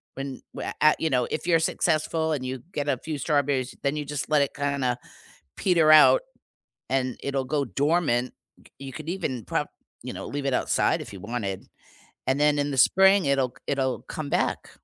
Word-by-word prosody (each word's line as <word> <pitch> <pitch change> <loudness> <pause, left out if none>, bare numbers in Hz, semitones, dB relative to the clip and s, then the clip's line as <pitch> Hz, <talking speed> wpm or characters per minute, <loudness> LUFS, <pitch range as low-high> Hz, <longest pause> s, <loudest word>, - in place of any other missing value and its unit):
when 135 -1 -6
wha - - -4
at 155 0 +5
you 160 - 0
know, 125 -2 +2
if 160 - -3
you're 165 -2 +4
successful 160 0 0
and 130 -3 -3
you 130 -1 -4
get 145 0 -2
a 130 - +1
few 155 +2 -5
strawberries, 140 -3 0
then 140 +2 0
you 150 -1 -3
just 145 +1 -4
let 150 -2 +4
it 140 - -4
kinda 140 -3 -1 0.6
peter 165 -5 +4
out 305 - +7 0.7
and 130 -2 0
it'll 135 -1 -1
go 140 +1 -1
dormant, 140 -3 0 0.2
c - - -23
you 135 -1 -8
could 155 0 -8
even 135 - -3
prob - - -2 0.3
you - - -6
know, - - -7
leave 140 -1 -4
it 135 - +1
outside - - +1
if - - -10
you 95 - -9
wanted, 105 -3 -4 0.6
and 135 +2 +1
then 150 0 +3
in 145 0 0
the 135 - -3
spring, 190 +6 +5
it'll 135 -2 +2
c - - -31
it'll 135 -2 -1
come 155 -2 -6
back. - - -1
140 Hz, 200 wpm, -25 LUFS, 130-155 Hz, 0.7 s, out